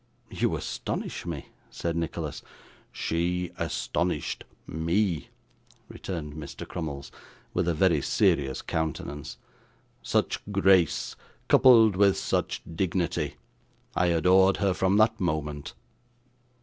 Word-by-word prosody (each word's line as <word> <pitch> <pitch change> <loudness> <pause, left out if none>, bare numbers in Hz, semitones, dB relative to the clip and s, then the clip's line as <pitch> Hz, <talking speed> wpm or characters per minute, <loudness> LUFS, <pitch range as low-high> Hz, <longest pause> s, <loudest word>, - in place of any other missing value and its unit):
'You - - 0
astonish - - -4
me!' - - -5 0.2
said 85 -1 -3
Nicholas. 85 -2 -3 0.5
'SHE 90 +2 -1
astonished 85 -4 -2 0.2
ME!' 85 +4 0 0.6
returned 80 -6 -6
Mr. 75 -2 -8
Crummles, 75 -5 -5 0.4
with - - 0
a 85 - +1
very 85 -3 +3
serious 65 0 +1
countenance. 75 -3 -3 0.6
'Such - - 0
grace, 95 -5 +3 0.3
coupled 115 -6 +7
with 100 0 +4
such - - -1
dignity! 90 0 -1 0.6
I 90 - +3
adored 95 +3 +4
her 100 -2 +2
from 95 +2 +2
that 110 +1 +4
moment! 75 -4 -2
85 Hz, 100 wpm, -27 LUFS, 80-95 Hz, 0.6 s, coupled